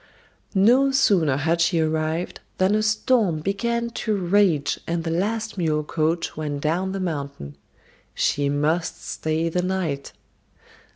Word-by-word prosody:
No 245 +8 +5
sooner 185 - +3
had 165 +4 +1
she 170 0 +2
arrived 160 +2 -1 0.2
than 185 +2 +3
a 215 - +2
storm 215 -5 +1
began 235 +6 -1
to 220 -2 -1
rage 185 -4 +2
and 170 0 -1
the 165 - -2
last 215 +4 -2
mule 155 -3 +1
coach 160 +2 -1
went 150 -2 -4
down 175 +5 0
the 195 - -3
mountain. 140 - -4 0.6
She 145 0 +1
must 150 +4 -1
stay 160 +1 -1
the 180 +2 0
night! 180 -7 -2
170 Hz, 135 wpm, -23 LUFS, 155-200 Hz, 0.6 s, No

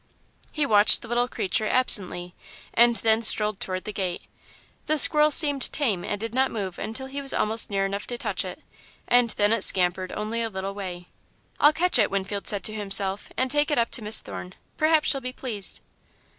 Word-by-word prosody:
He 300 -2 -2
watched 210 -2 +6
the - - -10
little 240 +1 -1
creature, 215 -2 -2
absently, 185 -8 0 0.4
and 235 0 +4
then 225 0 0
strolled 210 -2 +5
toward 185 -1 -5
the 210 - -7
gate. 185 -3 -5 0.6
The 310 - 0
squirrel 300 +1 +5
seemed 290 -3 +3
tame 220 - -1
and 205 - -4
did 225 +1 -6
not 265 +1 +1
move 195 -5 -6
until 225 +5 -6
he 275 +1 -7
was 275 - +1
almost 220 +2 0
near 195 -1 -1
enough 200 +1 -5
to 240 - -5
touch - - -2
it, - - -10 0.4
and 245 -1 +2
then 210 0 0
it 230 - -1
scampered 185 0 +1
only 220 +2 -4
a 225 - -3
little 195 -1 -6
way. 180 -3 -9 0.5
"I'll 295 - +5
catch 345 -2 +1
it," 210 - +2
Winfield 200 +1 -5
said 200 -3 +1
to 215 - -2
himself, 195 -1 0
"and 260 0 -1
take 295 +2 0
it 295 - -1
up 235 -1 0
to 245 - -1
Miss 215 +1 +2
Thorne. 90 -2 -10 0.2
Perhaps 310 0 +1
she'll 275 - 0
be 255 0 -6
pleased." 220 -7 -4
220 Hz, 200 wpm, -24 LUFS, 195-255 Hz, 0.6 s, watched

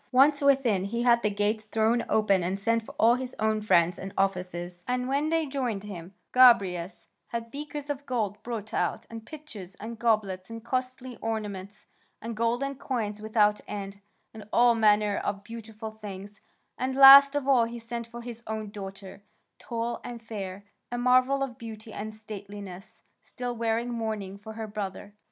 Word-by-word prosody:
Once 285 +3 +5
within, 260 -9 +3
he 235 +4 -2
had 235 -1 +5
the 215 - +1
gates 210 +1 -1
thrown 225 +2 +1
open 200 -3 +3
and 185 +3 -2
sent 230 +3 +1
for 220 - -12
all 230 +2 +5
his 255 0 -4
own 220 0 +1
friends 175 -4 +3
and 195 +1 -6
officers. 180 -2 -2
And 250 0 -1
when 280 +3 0
they 325 -1 +1
joined 255 -8 -2
him, 185 -2 -9 0.2
Gobryas 200 -8 +4 0.2
had 230 0 -5
beakers 295 0 -6
of 285 -1 -5
gold 215 -5 -2
brought 225 -2 -6
out, - - -1
and 225 -1 -7
pitchers, 230 - -10
and 225 +3 -8
goblets, 210 -5 0
and 230 0 -8
costly 255 0 -3
ornaments, 210 -3 -5 0.3
and 230 +1 -6
golden 240 +5 0
coins 215 -6 -3
without 210 -1 +2
end, 200 -1 -6 0.3
and 215 -1 -11
all 240 0 +5
manner 210 -2 +3
of 200 0 -3
beautiful 220 -1 -8
things, 205 -1 -9 0.4
and 260 +1 -1
last 275 +1 +10
of 285 -2 -1
all 255 -4 +5
he 235 +1 -6
sent 235 0 -6
for 235 0 -9
his 235 -1 -8
own 215 -1 -4
daughter, 195 -1 -9 0.4
tall 235 0 -3
and 240 -1 -7
fair, 200 -3 -6 0.3
a 245 - -2
marvel 255 +2 +3
of 255 -2 -6
beauty 220 -1 -9
and 215 +1 -6
stateliness, 200 -3 -10 0.2
still 245 -1 -5
wearing 230 +1 0
mourning 215 -4 -4
for 220 +2 -9
her 220 0 -5
brother. 205 -1 -6
220 Hz, 170 wpm, -28 LUFS, 205-245 Hz, 0.4 s, last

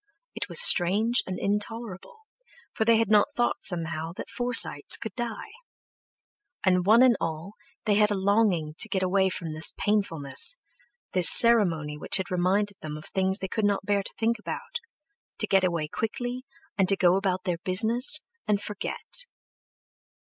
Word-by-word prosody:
It - - -6
was - - +4
strange 220 - +4
and 185 - -5
intolerable, 215 - -5 0.5
for 220 - -2
they 230 0 +3
had 225 -2 -1
not 215 +8 +2
thought 240 0 -2
somehow, 165 -2 -3
that - - -9
Forsytes 245 -12 +1
could 220 -4 -8
die. 240 - -7 1.1
And 180 -1 +1
one 230 +4 +5
and 250 -2 +4
all 165 +4 -6 0.3
they 210 - +1
had 210 +1 +2
a 205 - -2
longing 190 -5 0
to 225 - +3
get 190 -1 -2
away 190 +1 +1
from 170 -3 -7
this 155 +1 +2
painfulness, 165 - -2 0.6
this 180 -2 +8
ceremony 170 -11 +5
which - - +2
had 190 -2 -6
reminded 190 +3 -1
them 150 -1 -7
of 155 - -13
things 190 0 -2
they 190 - -6
could 220 +3 -4
not 205 -1 -1
bear 205 0 0
to - - -6
think 230 0 -1
about—to 330 - -9
get 195 -2 +1
away 170 -4 -2
quickly 245 - -6 0.3
and 190 -1 +1
go 180 0 +2
about 190 -1 -2
their 175 -3 -3
business 225 - +3 0.3
and 210 -1 0
forget. 210 - -3
200 Hz, 160 wpm, -25 LUFS, 180-225 Hz, 1.1 s, this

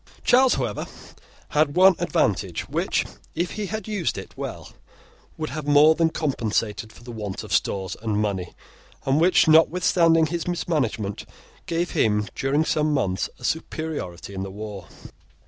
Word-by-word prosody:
Charles, 255 +1 +5
however, - - -3 0.6
had 150 -1 +2
one 190 +1 +7
advantage, - - 0
which, - - 0 0.3
if 175 +1 -1
he 210 -2 -4
had 215 +1 -5
used 205 -6 -1
it - - -8
well, - - -6 0.7
would 155 -3 -4
have 150 +1 -5
more 150 +2 +7
than 165 0 +2
compensated 110 -8 -2
for 120 - -16
the 120 - -8
want 105 -4 -5
of - - -6
stores 95 -2 0
and 110 -2 -1
money, 100 -4 -2 0.5
and 135 +3 +2
which, 180 0 +5
notwithstanding 165 0 +5
his 170 +2 -3
mismanagement, 140 - -1 0.4
gave 170 +1 -1
him, 105 -1 +1
during 145 +4 +1
some 155 -1 +1
months, 100 -10 0
a - - -17
superiority 150 - -4
in 95 - -4
the 95 - -4
war. 100 -3 -8
150 Hz, 150 wpm, -24 LUFS, 105-165 Hz, 0.7 s, one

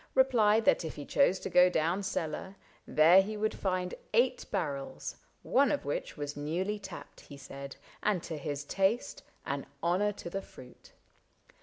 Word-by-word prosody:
Replied 225 -5 +4
that - - +4
if 160 - -5
he 145 - -7
chose 195 -10 +3
to - - -4
go 180 0 +7
down 170 +3 0
cellar. 190 0 -3 0.3
There 165 +5 +7
he 210 +2 -4
would 215 +1 0
find 185 -2 -2 0.2
eight 245 +3 +2
barrels 145 -9 -3 0.2
— - - -40 0.2
one 280 -1 +5
of 290 - -1
which 145 - -3
Was 145 0 -4
newly 180 +8 -2
tapped, 190 -2 -10
he 140 - -12
said, 140 0 -9 0.3
and 200 -5 +1
to 165 - -5
his 145 -1 -4
taste 195 - 0 0.2
An 140 0 -3 0.2
honor 185 +5 +2
to - - -9
the 195 - -3
fruit. 125 -8 -15
180 Hz, 170 wpm, -31 LUFS, 150-210 Hz, 0.3 s, go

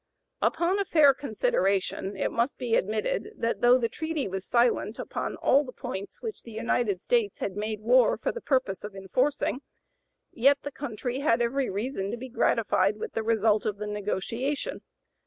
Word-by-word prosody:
Upon 350 +4 +1
a - - +2
fair 305 -7 +5
consideration, 215 - -1
it - - -1
must 235 +4 0
be 245 -3 -3
admitted 225 - 0
that 230 0 -1
though 245 +1 +6
the 235 -2 0
treaty 315 +2 -3
was 190 0 -4
silent 235 -2 +2
upon - - -4
all 280 +3 +3
the 255 - -8
points 195 -4 -7
which 445 -2 -5
the 230 - -12
United 220 -3 0
States 460 - +1
had 190 - -3
made 215 0 -3
war 245 +3 +4
for - - -1
the 470 - -7
purpose 255 -9 0
of 210 -1 -7
enforcing, 255 +8 0 0.7
yet 275 +4 +3
the 285 - -5
country 250 -1 -4
had 245 -5 +2
every 255 +3 0
reason 200 0 -3
to 240 - -3
be 260 +2 -8
gratified 245 - +2
with 450 -1 -6
the 225 - -1
result 220 -1 +2
of 205 -1 -2
the 210 - -4
negotiation. 210 +7 -3
240 Hz, 175 wpm, -27 LUFS, 210-280 Hz, 0.7 s, though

